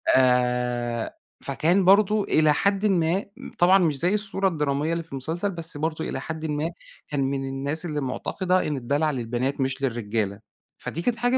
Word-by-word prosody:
آآ 125 -2 +1 0.3
فكان 180 +4 +2
برضه 205 +2 +5
إلى 155 -5 +3
حدٍ 200 +5 +1
ما 180 -1 +2 0.3
طبعًا 180 +2 +6
مش 165 -7 +2
زي 180 +6 +2
الصورة 200 -2 0
الدرامية 150 -2 0
اللي 170 0 -2
في 165 - -26
المسلسل، 160 +9 -2
بس 165 -3 -2
برضه 160 +1 -2
إلى - - -3
حدٍ 160 -1 -5
ما 150 +1 -1 0.4
كان 145 -2 -2
من 135 0 -1
الناس 140 +5 -2
اللي 150 -3 -2
مُعتقدة 185 +7 0
إن 150 -2 -1
الدَلَع 145 +5 0
للبنات 125 +2 -2
مش 135 +1 -1
للرجالة. 110 -5 -1 0.4
فدي 170 - -4
كانت 235 +6 0
حاجة 245 +2 +2
155 Hz, 170 wpm, -25 LUFS, 135-180 Hz, 0.4 s, طبعًا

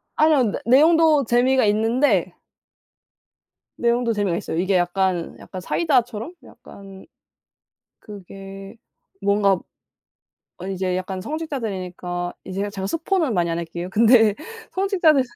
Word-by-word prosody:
아니요. 290 -8 +3
내 - - -4
내용도 310 +3 +5
재미가 245 +1 +3
있는데 215 - +1 1.5
내용도 235 0 +1
재미가 200 -5 -1
있어요. 160 - -4
이게 190 +2 +1
약간 175 -1 -1
약간 185 - -9
사이다처럼 250 - 0
약간 195 -1 -14 0.9
그게 195 0 -11 0.4
뭔가 200 -2 +2 1.0
아니 190 +2 -5
이제 185 -1 -2
약간 185 0 -4
성직자들이니까 185 - -4
이 190 - -7
제가 200 +2 -2
제가 195 -2 -5
스포는 330 - 0
많이 170 -2 0
안 165 - -2
할게요. 170 +2 -5
근데 225 0 +5 0.4
성직자들 360 -8 +2
205 Hz, 280 characters per minute, -22 LUFS, 185-260 Hz, 1.5 s, 내용도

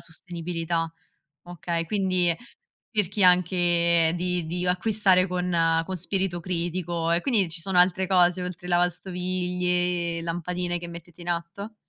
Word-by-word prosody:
sostenibilità. 165 -1 -4 0.5
Okay, 170 -1 -3
quindi 185 -2 +1 0.6
cerchi 205 -1 +1
anche 175 -2 +4
di 180 -1 -1
di 175 +3 -3
acquistare 185 0 +3
con 180 -1 -2 0.3
con 190 - -4
spirito 185 0 -1
critico 170 -1 -2
e 170 +1 +1
quindi 215 -9 +2
ci 165 0 -6
sono 185 0 0
altre 185 +1 +4
cose, 180 -1 +3
oltre 180 0 -6
lavastoviglie, 180 -1 0
lampadine 175 +1 -3
che 175 - -7
mettete 170 0 -11
in 175 - -8
atto? 175 +6 -5
180 Hz, 125 wpm, -25 LUFS, 170-185 Hz, 0.6 s, anche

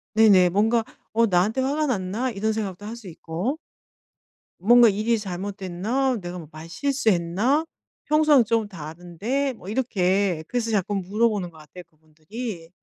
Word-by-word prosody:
네네. 200 -5 +6
뭔가 220 +5 +2 0.3
'어 230 +1 +4
나한테 205 +6 +1
화가 290 +3 0
났나?' 220 +2 -1
이런 220 +1 -1
생각도 205 -2 -4
할 225 +2 -6
수 225 -5 -12
있고. 175 - -4 1.0
'뭔가 235 +4 +6
일이 215 +3 +1
잘못됐나? 200 +6 -2
내가 175 +1 -6
뭐 160 -3 -9
말실수했나? 215 - 0 0.4
평소랑 305 -4 +5
좀 225 -1 0
다른데.' 180 - -4
뭐 200 -4 -11
이렇게 195 -7 0
그래서 235 -2 -2
자꾸 205 0 0
물어보는 200 0 0
것 160 - -18
같아요, 155 +4 -12
그분들이. 165 +5 -8
205 Hz, 305 characters per minute, -24 LUFS, 180-235 Hz, 1.0 s, 네네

